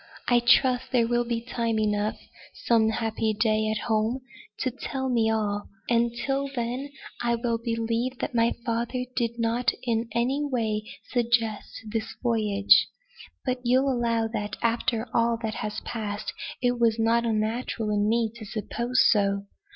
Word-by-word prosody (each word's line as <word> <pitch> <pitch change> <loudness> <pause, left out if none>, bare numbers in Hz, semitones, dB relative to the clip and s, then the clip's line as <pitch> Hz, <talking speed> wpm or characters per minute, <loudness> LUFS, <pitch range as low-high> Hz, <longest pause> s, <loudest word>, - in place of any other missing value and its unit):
I 245 -1 +5
trust 255 +1 +3
there 235 -3 +3
will 240 0 +1
be 235 -1 -1
time 230 -2 -1
enough, 210 0 0 0.4
some 225 -2 +3
happy 220 -1 0
day 215 0 +2
at 215 -1 -2
home, 225 +3 +1 0.4
to 255 - 0
tell 265 +1 -4
me 230 -3 +2
all. 205 -2 -1 0.2
And 235 0 +3
till 275 0 0
then, 245 +4 -2 0.3
I 235 0 +2
will 230 -1 -1
believe 230 +2 -1
that - - -3
my 230 0 +2
father 235 +2 -1
did 235 -1 -1
not 230 +1 +1
in 230 -1 0
any 260 +5 +1
way 225 -6 -1 0.3
suggest 230 -3 0
this 220 +1 -3
voyage. 210 -4 +4 0.6
But 255 -1 0
you'll 260 +3 +3
allow 230 -2 +1
that, 210 -2 -3
after 230 0 +1
all 230 0 +2
that 220 -1 -1
has 210 0 -3
passed, 210 -3 -4 0.3
it 245 0 +2
was 230 -1 +3
not 230 +1 +3
unnatural 220 0 -1
in 205 0 +2
me 230 -1 +1
to 230 - -9
suppose 235 +4 0
so. 200 -1 +2
230 Hz, 155 wpm, -26 LUFS, 220-240 Hz, 0.6 s, I